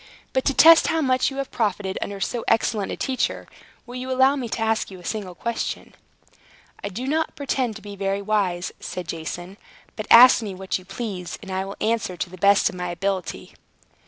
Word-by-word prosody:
But 260 - 0
to 280 - +2
test 330 +1 +8
how 325 - +1
much 255 -3 +2
you 270 - -8
have 275 -1 -4
profited 200 -3 -1
under 200 -1 -4
so 235 +4 -2
excellent 220 -2 +1
a - - -3
teacher, 260 -1 -2 0.4
will 245 - -11
you 255 +1 -5
allow 260 +2 +4
me 250 -4 -4
to - - -3
ask 225 0 0
you 190 -2 -10
a 175 - -14
single 200 -4 -4
question?" 235 +3 -4 0.9
"I 200 - -2
do 225 +7 -5
not 315 +3 -1
pretend 260 -5 -1
to 210 - -11
be 205 -1 -8
very 195 0 -1
wise," 195 -4 0
said 180 -2 -6
Jason. 175 +4 -6 0.4
"But 215 - -6
ask 245 +1 +9
me 205 -4 -5
what 190 0 -3
you 185 - -16
please, 195 -3 -5
and 195 - -8
I 190 0 -2
will 195 - -8
answer 215 -5 -1
to 180 - -3
the 185 - -10
best 200 +2 +4
of 220 - -3
my 180 -1 -4
ability." 190 +1 -3
210 Hz, 210 wpm, -23 LUFS, 190-250 Hz, 0.9 s, ask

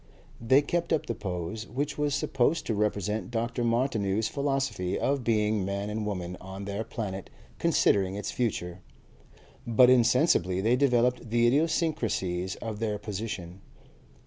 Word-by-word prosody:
They 130 +5 +4
kept 170 +3 -1
up 160 - +1
the 115 - -2
pose, 95 +2 -5
which 140 +5 -3
was 145 -1 0
supposed 135 +5 +1
to 115 - -1
represent 105 -1 -1
Dr. 120 +1 -2
Martineau's 115 -4 +1
philosophy, 135 -10 -1
of 140 -1 0
being 105 -3 +1
Man 100 +2 -3
and 105 0 -3
Woman 90 -3 -4
on 95 +1 -7
their 100 +2 -3
Planet 100 -5 -5 0.3
considering 95 -1 +2
its 105 - -4
Future, 90 -7 -2 0.9
but 125 +2 +6
insensibly 115 - +3
they 115 +5 +3
developed 125 -3 +2
the 120 +1 +3
idiosyncrasies 120 - 0
of 110 -2 -5
their 110 -2 -1
position. 100 -3 -6
110 Hz, 140 wpm, -28 LUFS, 100-125 Hz, 0.9 s, but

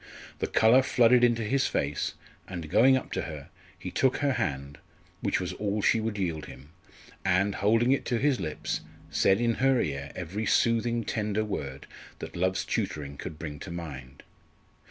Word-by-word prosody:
The - - -1
colour 115 +4 +5
flooded 125 -1 +4
into 120 -1 +3
his 135 +5 +1
face, 70 +1 -2 0.3
and 85 -4 -6
going 130 +6 +6
up - - -6
to - - -1
her 75 -2 -7 0.3
he 90 0 -7
took 130 +5 +2
her 145 -1 +1
hand, 70 - -3 0.4
which - - +1
was - - -3
all 105 0 -2
she 115 - +4
would 110 -1 -2
yield 85 -5 -2
him, 65 +4 -12 0.5
and, 95 +2 +2
holding 115 +6 +3
it 135 - +2
to 120 - 0
his 135 +1 +2
lips, 80 -4 -3 0.3
said 95 +1 +3
in 115 -1 +2
her 135 -1 +4
ear 70 -4 -3
every 95 +5 -4
soothing 115 0 +2
tender 105 0 -1
word 70 -9 -5 0.3
that - - -8
love's 95 +2 0
tutoring 70 -2 -3
could 75 +2 -7
bring 75 -3 -6
to 95 - -8
mind. 70 -6 -8
100 Hz, 175 wpm, -28 LUFS, 75-115 Hz, 0.5 s, going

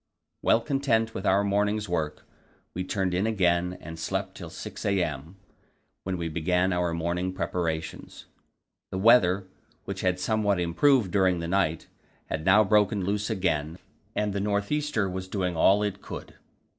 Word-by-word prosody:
Well 115 - +3
content 115 -5 0
with 95 - -3
our 100 +2 +4
morning's 105 +1 0
work, 80 -4 -3 0.5
we 90 - -3
turned 95 -1 -1
in 95 +4 +1
again 90 -4 +1
and 80 0 -9
slept - - -3
till - - -9
6 - - -8
a.m., 85 -4 -1 0.7
when 95 -1 -3
we 85 -1 -3
began 90 +3 +1
our 90 -1 0
morning 85 +2 -1
preparations. 80 -4 -4 0.6
The - - -4
weather, 95 -3 +5 0.4
which 100 -1 -5
had 90 -1 +1
somewhat 105 -1 +1
improved 95 - +3
during 95 -2 +3
the 85 - -4
night, 85 -3 0 0.4
had 80 0 -3
now 105 +3 +6
broken 105 -2 +2
loose 105 +2 -1
again, 85 -6 -1 0.4
and 105 -1 0
the 100 - -1
north 100 0 -1
easter 150 -9 0
was 95 0 -5
doing 95 -3 -2
all 95 +5 +4
it 100 -1 -3
could. - - -8
95 Hz, 155 wpm, -27 LUFS, 85-105 Hz, 0.7 s, now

